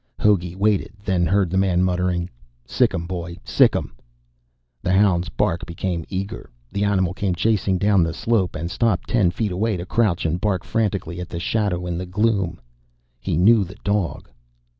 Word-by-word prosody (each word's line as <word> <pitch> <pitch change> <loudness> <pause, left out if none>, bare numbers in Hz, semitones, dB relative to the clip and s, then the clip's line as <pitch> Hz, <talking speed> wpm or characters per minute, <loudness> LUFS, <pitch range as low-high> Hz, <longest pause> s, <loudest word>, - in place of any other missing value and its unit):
Hogey 90 -4 +2
waited, 105 0 +1
then 90 -3 +1
heard 95 -1 +2
the 95 - +2
man 90 -2 +2
muttering, 90 -1 0 0.4
"Sic - - +1
'im, 85 - -3
boy, 85 -1 -5
sic - - +4
'im." - - -3 0.9
The 90 - 0
hound's 95 -3 +3
bark 85 +2 -1
became 85 -1 -3
eager. 95 +1 -5 0.2
The 100 - -1
animal 95 -3 +1
came 95 -1 -1
chasing 100 -1 +1
down 100 0 +3
the 85 0 +1
slope, 100 +2 0
and 85 +2 -4
stopped 115 -4 0
ten 105 -7 +3
feet 105 +3 -2
away 105 +3 0
to 85 - -5
crouch 100 -5 +1
and 85 +2 -1
bark 100 -4 0
frantically 100 -6 -2
at 90 - -6
the 85 - -5
shadow 90 -2 -1
in 85 -1 -3
the 90 - -5
gloom. 100 -2 0 0.6
He 75 - -2
knew 105 +4 +5
the 95 +2 -10
dog. 100 -3 -1
95 Hz, 180 wpm, -22 LUFS, 85-100 Hz, 0.9 s, knew